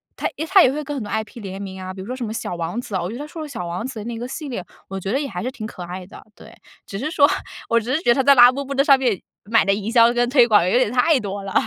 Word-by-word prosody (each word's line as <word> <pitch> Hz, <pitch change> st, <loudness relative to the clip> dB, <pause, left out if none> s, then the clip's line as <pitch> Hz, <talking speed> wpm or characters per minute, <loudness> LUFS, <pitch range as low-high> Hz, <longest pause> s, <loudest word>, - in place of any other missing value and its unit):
它 -, -, -2 dB, 0.2 s
它 385 Hz, -, +6 dB
也 255 Hz, -, +4 dB
会 300 Hz, +2 st, -3 dB
跟 290 Hz, 0 st, -5 dB
很 255 Hz, -, -4 dB
多 205 Hz, -, -8 dB
IP 220 Hz, +2 st, -4 dB
联 195 Hz, -1 st, -7 dB
名 190 Hz, -1 st, -7 dB
啊， 185 Hz, 0 st, -6 dB
比 190 Hz, -, -11 dB
如 190 Hz, -, -7 dB
说 255 Hz, -, -4 dB
什 255 Hz, -2 st, -4 dB
么 215 Hz, -, -5 dB
小 225 Hz, -5 st, -4 dB
王 170 Hz, +6 st, -3 dB
子 220 Hz, -5 st, -6 dB
啊， 185 Hz, -, 0 dB
我 175 Hz, -, -3 dB
觉 225 Hz, -, -6 dB
得 -, -, -9 dB
它 295 Hz, -, -6 dB
出 320 Hz, +1 st, -8 dB
的 310 Hz, -, -5 dB
小 180 Hz, -10 st, -5 dB
王 180 Hz, +7 st, -4 dB
子 265 Hz, -2 st, -6 dB
的 210 Hz, -, -7 dB
那 235 Hz, -1 st, -5 dB
个 240 Hz, -, -5 dB
系 295 Hz, +2 st, -6 dB
列， 235 Hz, -9 st, -5 dB, 0.2 s
我 195 Hz, -, -6 dB
觉 195 Hz, +2 st, -4 dB
得 270 Hz, -, +1 dB
也 290 Hz, -, -3 dB
还 185 Hz, -6 st, -5 dB
是 255 Hz, -, -3 dB
挺 220 Hz, -5 st, -7 dB
可 180 Hz, -, -9 dB
爱 180 Hz, +1 st, -7 dB
的， -, -, -13 dB
对， -, -, -15 dB, 0.3 s
只 195 Hz, -, -7 dB
是 300 Hz, +8 st, -3 dB
说 285 Hz, -4 st, +5 dB, 0.4 s
我 230 Hz, -, +2 dB
只 245 Hz, +4 st, -3 dB
是 310 Hz, -, +2 dB
觉 240 Hz, -, +3 dB
得 -, -, +4 dB
它 270 Hz, -, +1 dB
在 280 Hz, +1 st, +7 dB
拉 245 Hz, -1 st, +8 dB
布 275 Hz, +2 st, -3 dB
布 275 Hz, 0 st, -5 dB
的 275 Hz, -, +2 dB
上 275 Hz, -2 st, +6 dB
面 240 Hz, -8 st, 0 dB, 0.2 s
买 225 Hz, +1 st, +2 dB
的 195 Hz, -, +3 dB
营 210 Hz, +2 st, -3 dB
销 235 Hz, 0 st, +5 dB
跟 245 Hz, 0 st, +1 dB
推 250 Hz, -2 st, +5 dB
广 205 Hz, -5 st, +4 dB
有 -, -, +3 dB
点 255 Hz, -4 st, +2 dB
太 265 Hz, +3 st, +3 dB
多 200 Hz, -1 st, -5 dB
了。 195 Hz, -, -6 dB
235 Hz, 380 characters per minute, -21 LUFS, 195-265 Hz, 0.4 s, 拉